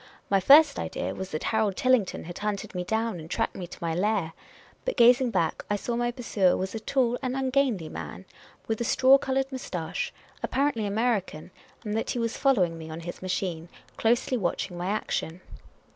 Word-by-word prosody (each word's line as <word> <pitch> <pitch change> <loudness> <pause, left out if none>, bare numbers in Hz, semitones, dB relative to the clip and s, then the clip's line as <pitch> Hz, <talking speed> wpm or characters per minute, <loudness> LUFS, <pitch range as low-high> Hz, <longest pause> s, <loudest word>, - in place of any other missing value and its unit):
My 195 - +5
first 285 - +7
idea - - -3
was 190 0 -6
that 155 - -4
Harold 220 -3 +1
Tillington 255 -7 +2
had 175 +1 -8
hunted 210 -1 -3
me 180 -1 -2
down 220 0 -1
and 160 0 -10
tracked 225 +4 -1
me 180 -2 -6
to - - -11
my 165 -1 -2
lair; 185 -2 0 0.5
but - - -2
gazing 245 +1 +6
back, 180 -7 0
I 205 - +2
saw 235 +3 -3
my 240 0 0
pursuer 225 -6 +1
was 190 +1 -3
a 225 - -3
tall 245 +1 +1
and 255 -1 -2
ungainly 260 - +1
man, - - -7 0.4
with 225 +1 -2
a - - +2
straw 265 +3 +5
coloured 270 0 -1
moustache, 175 -11 -4 0.3
apparently 265 -6 0
American, 200 -6 -1 0.3
and 210 -2 -3
that 225 - -1
he - - -1
was 230 -1 -1
following 185 -12 +2
me 160 0 -8
on 160 +1 -6
his 175 +1 -7
machine, 180 -3 -3 0.3
closely 240 +3 +1
watching 180 -2 -2
my 175 +1 -3
action. 185 -4 -2
215 Hz, 190 wpm, -27 LUFS, 180-245 Hz, 0.5 s, first